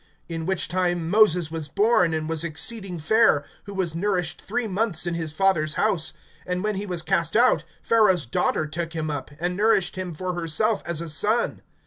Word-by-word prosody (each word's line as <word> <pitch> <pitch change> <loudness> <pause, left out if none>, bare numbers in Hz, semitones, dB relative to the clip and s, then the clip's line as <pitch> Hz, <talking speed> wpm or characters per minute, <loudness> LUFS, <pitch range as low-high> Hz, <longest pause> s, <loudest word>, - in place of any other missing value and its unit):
(20)In 165 0 -4
which 190 -1 +1
time 175 -1 -1
Moses 180 -6 +4
was 160 -2 -3
born, 200 0 +3
and 155 -1 -2
was 165 0 -1
exceeding 180 +3 -4
fair[7:20], 165 -2 +3 0.2
who 200 - -8
was 180 -4 -1
nourished 180 -2 -1
three 230 +2 -2
months 195 -3 0
in 175 - -1
his 165 -2 -3
father's 155 -3 +1
house. 190 -7 0 0.3
(21)And 180 +1 -1
when 215 0 0
he 205 +1 -4
was 175 -3 -1
cast 170 +4 +1
out, 250 +2 +4 0.2
Pharaoh's 210 - +3
daughter 125 +5 0
took 165 +2 -4
him 155 -2 -2
up, 145 -3 -5
and 175 +2 -1
nourished 195 -3 +2
him 180 -3 -4
for 180 +3 -3
herself 175 +6 0
as 170 -2 -1
a 170 - -5
son. 210 +9 0
175 Hz, 190 wpm, -24 LUFS, 160-205 Hz, 0.3 s, Moses